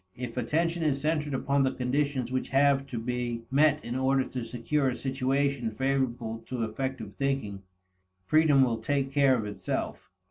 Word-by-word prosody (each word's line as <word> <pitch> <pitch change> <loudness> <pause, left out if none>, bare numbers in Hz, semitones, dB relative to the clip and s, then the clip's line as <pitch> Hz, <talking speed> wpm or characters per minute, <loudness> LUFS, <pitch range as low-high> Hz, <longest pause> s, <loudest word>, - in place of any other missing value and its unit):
If 120 -2 -6
attention 165 +8 0
is 145 -4 +1
centered 150 -1 0
upon 140 +1 +1
the 130 -1 +2
conditions 130 -1 -1
which 130 0 -2
have 135 0 +3
to 125 - -5
be 120 0 -3
met 150 +2 +3
in 120 - -4
order 130 +1 +2
to 125 -2 -4
secure 130 +4 0
a 125 - -2
situation 135 -1 0
favorable 120 -2 -1
to 125 -3 -2
effective 110 -1 -4
thinking, 135 -8 -2 0.6
freedom 155 +1 +5
will 115 -3 0
take 135 +3 -1
care 135 -2 +4
of 110 - -3
itself. 100 -3 -4
130 Hz, 165 wpm, -28 LUFS, 120-140 Hz, 0.6 s, freedom